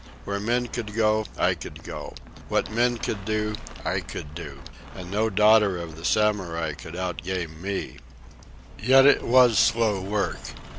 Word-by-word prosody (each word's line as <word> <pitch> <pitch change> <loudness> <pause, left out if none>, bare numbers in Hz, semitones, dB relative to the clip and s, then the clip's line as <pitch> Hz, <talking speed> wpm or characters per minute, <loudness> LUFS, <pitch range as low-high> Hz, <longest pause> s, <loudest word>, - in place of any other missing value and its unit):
Where 100 0 -2
men 120 +4 0
could 115 -3 -6
go, 110 -1 +2
I - - +3
could - - -10
go. - - -8 0.3
What - - 0
men 120 +2 +2
could 105 -3 -4
do, 105 +1 -1 0.3
I - - 0
could 75 - -8
do. 70 -4 -8 0.3
And 90 -1 -8
no 110 +2 +1
daughter 105 -2 +4
of 85 -2 -7
the 80 - -12
Samurai 90 -7 +1
could 80 +3 -10
out 90 -1 -3
game 85 -3 -4
me. 100 +1 -4 0.8
Yet 135 +4 +6
it 145 - +6
was 120 -3 +5
slow 115 -4 +2
work. 100 +1 -2
105 Hz, 160 wpm, -25 LUFS, 90-110 Hz, 0.8 s, Yet